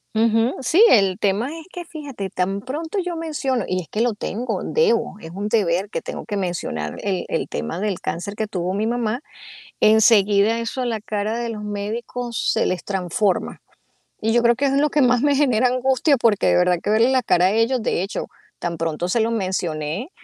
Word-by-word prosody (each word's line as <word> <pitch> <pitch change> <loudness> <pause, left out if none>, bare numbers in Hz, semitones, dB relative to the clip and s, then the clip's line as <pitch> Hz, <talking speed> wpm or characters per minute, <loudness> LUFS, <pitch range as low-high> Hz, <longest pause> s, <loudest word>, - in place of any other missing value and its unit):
Ujú. 225 +2 +2
Sí, 325 - +4
el 195 -3 +4
tema 205 +4 +1
es 320 - -13
que 350 -1 -7
fíjate, 280 - -7
tan 195 +2 -1
pronto 315 - -5
yo 360 -2 -3
menciono 290 -8 -2
y 185 0 -1
es 160 - -12
que 215 - -2
lo 240 -1 +2
tengo, 220 +3 -3
debo, 465 - +1
es 160 - -9
un 200 +3 -4
deber 195 -3 +1
que - - -3
tengo - - -7
que 205 -3 -3
mencionar 160 - -3
el 190 -3 -2
el - - -1
tema 75 - -4
del 205 -3 -2
cáncer 190 +5 -4
que 215 0 -2
tuvo 185 -3 -2
mi 215 +3 -1
mamá, 240 +1 -1 0.6
enseguida 215 0 +5
eso 230 +2 -3
la 225 -2 -2
cara 215 +1 -2
de 235 -1 -3
los 215 -2 -6
médicos 225 +4 -3
se - - +1
les 185 - -2
transforma. 190 0 -1 0.6
Y 225 +1 +1
yo 240 +1 +3
creo 235 0 +5
que 285 - -1
es 270 - +1
lo 285 +2 +3
que 295 0 +2
más 245 -1 +4
me 285 0 +3
genera 255 -4 +3
angustia, 260 +3 +2
porque 230 -5 +2
de - - +4
verdad 180 0 +3
que 205 - -1
verle 225 +4 +4
la 260 -1 +2
cara 180 -5 +3
a - - +3
ellos, 230 +3 +1
de 180 - 0
hecho, 195 - -4 0.3
tan 170 -1 -4
pronto 165 +1 -2
se 225 +5 +1
lo 225 - +1
mencioné, 185 - -2
220 Hz, 210 wpm, -21 LUFS, 190-250 Hz, 0.6 s, enseguida